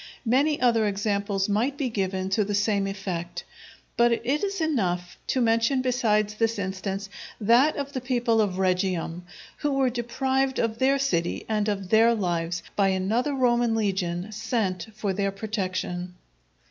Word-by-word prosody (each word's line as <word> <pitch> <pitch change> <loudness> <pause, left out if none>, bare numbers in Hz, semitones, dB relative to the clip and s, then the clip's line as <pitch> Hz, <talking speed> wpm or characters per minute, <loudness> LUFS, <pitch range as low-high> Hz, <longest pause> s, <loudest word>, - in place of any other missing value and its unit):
Many 280 +6 +2
other 230 -3 +3
examples 200 -1 -1
might 235 +7 0
be 275 - -1
given 190 -4 -2
to 210 +2 +3
the 205 0 -2
same 200 -1 +1
effect, 190 -3 -4 0.5
but 235 0 +4
it 235 - -1 0.2
is 395 -1 -1
enough 185 - -1
to 260 - 0
mention 230 +3 +2
besides 215 -5 +1
this 225 +1 0
instance, 195 +1 -3 0.3
that 240 +8 +4
of 280 0 -4
the 260 - -3
people 240 -3 +1
of 200 -4 0
Regium, 180 -2 0 0.4
who 295 -2 -1
were 265 -2 +2
deprived 265 +3 -1
of 230 -1 -1
their 270 +1 +3
city 175 -12 -1
and 215 -1 0
of 195 -3 -3
their 225 +1 +5
lives 170 -4 -2
by 200 -1 +3
another 215 +9 0
Roman 240 -3 +2
legion 190 -3 -1
sent 215 -4 -2
for 210 -3 -2
their 195 0 0
protection. 185 -3 -3
215 Hz, 155 wpm, -26 LUFS, 190-240 Hz, 0.5 s, their